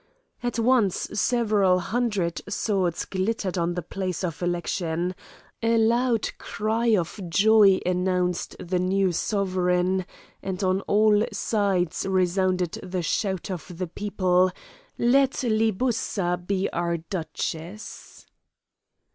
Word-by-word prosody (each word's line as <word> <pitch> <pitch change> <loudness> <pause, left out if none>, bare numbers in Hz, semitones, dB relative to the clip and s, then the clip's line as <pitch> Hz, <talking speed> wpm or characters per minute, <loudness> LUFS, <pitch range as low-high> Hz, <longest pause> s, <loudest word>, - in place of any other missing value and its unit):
At 245 -1 -2
once 230 -5 +3 0.2
several 210 -4 +2
hundred 200 -3 -1
swords 195 -5 -1
glittered 195 0 -2
on 175 -1 0
the 175 - -3
place 185 +1 -4
of 170 -2 -3
election, 175 0 -1 0.5
a 230 0 +2
loud 230 0 +2
cry 220 +3 -1
of 175 +3 -3
joy 205 +1 +5
announced 180 -1 0
the 180 +1 -1
new 190 +1 +2
sovereign, 185 -1 0 0.3
and 190 0 -4
on 185 +1 +1
all 210 0 +4
sides 195 -6 0
resounded 185 -1 +1
the 180 -1 -3
shout 190 +2 -1
of 180 -1 -7
the 185 - -2
people: 185 0 +1 0.5
"Let 265 +3 +3
Libussa 215 -5 0
be 195 -1 0
our 170 0 0
duchess!" 170 +2 -6
190 Hz, 110 wpm, -25 LUFS, 180-215 Hz, 0.5 s, joy